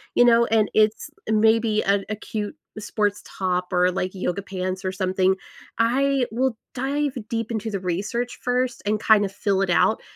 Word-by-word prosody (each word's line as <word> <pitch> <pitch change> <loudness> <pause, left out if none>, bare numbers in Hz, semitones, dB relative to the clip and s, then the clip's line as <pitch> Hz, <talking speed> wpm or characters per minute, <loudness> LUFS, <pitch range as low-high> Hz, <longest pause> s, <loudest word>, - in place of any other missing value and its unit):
you - - +6
know, 235 0 +5
and 220 -2 +2
it's, 215 0 +2 0.2
maybe, 220 0 +3
an 200 0 +2
a 215 - -1
cute 210 -1 -5 0.2
sports 205 -1 -1
top 180 -1 -2
or, 180 0 +4
like, 185 0 -2
yoga 185 0 -2
pants 185 -1 -4
or 185 - 0
something, 190 0 +1 0.4
I 265 +3 +2
will 245 0 0 0.2
dive 280 +2 -1 0.2
deep 230 0 -2
into 220 0 -2
the 195 - -2
research, 205 +7 -3
first, 250 0 -1
and 210 +1 +1
kind 215 -1 +5
of 195 - -5
fill 195 -1 0
it 195 - 0
out 195 +5 +3
215 Hz, 175 wpm, -23 LUFS, 190-230 Hz, 0.4 s, you